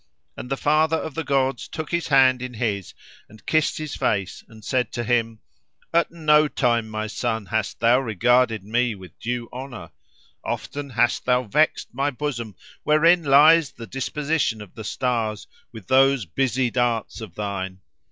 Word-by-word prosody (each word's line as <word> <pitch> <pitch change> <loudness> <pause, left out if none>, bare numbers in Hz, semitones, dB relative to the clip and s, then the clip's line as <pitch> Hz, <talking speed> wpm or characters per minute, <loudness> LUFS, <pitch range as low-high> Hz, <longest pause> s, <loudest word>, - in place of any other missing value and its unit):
And 125 - -8
the 135 - -1
father 155 +3 +2
of 160 - -5
gods 135 -3 0
took 155 -2 -6
his 170 -1 -1
hand 130 -3 +4
in 125 -1 -6
his, 105 -5 -3 0.3
and 110 +1 -17
kissed 155 0 +1
his 155 -2 -5
face 100 -3 -1
and 110 -2 -15
said 125 -1 0
to 120 - -2
him, 115 -1 0 0.5
"At 170 0 +3
no 155 -2 +3
time, 120 -5 0
my 110 0 -3
son, 110 -1 -3
hast 110 +2 -2
thou 120 +2 +4
regarded 120 -1 +2
me 115 +2 0
with 95 -4 -14
due 120 0 -3
honour. 120 -9 -8 0.5
Often 145 -1 -5
hast 120 -1 +1
thou 125 0 +2
vexed 150 +6 0
my 135 +3 0
bosom, 125 -7 -4 0.3
wherein 165 +4 +4
lies 150 +1 +5
the 115 - -9
disposition 140 -1 -1
of 105 -3 -11
the 110 - -8
stars, 110 -2 -2 0.3
with 110 -5 -11
those 135 -1 +3
busy 125 +5 0
darts 120 -2 -1
of 110 - -9
thine. 95 -2 -4
125 Hz, 160 wpm, -23 LUFS, 110-140 Hz, 0.5 s, lies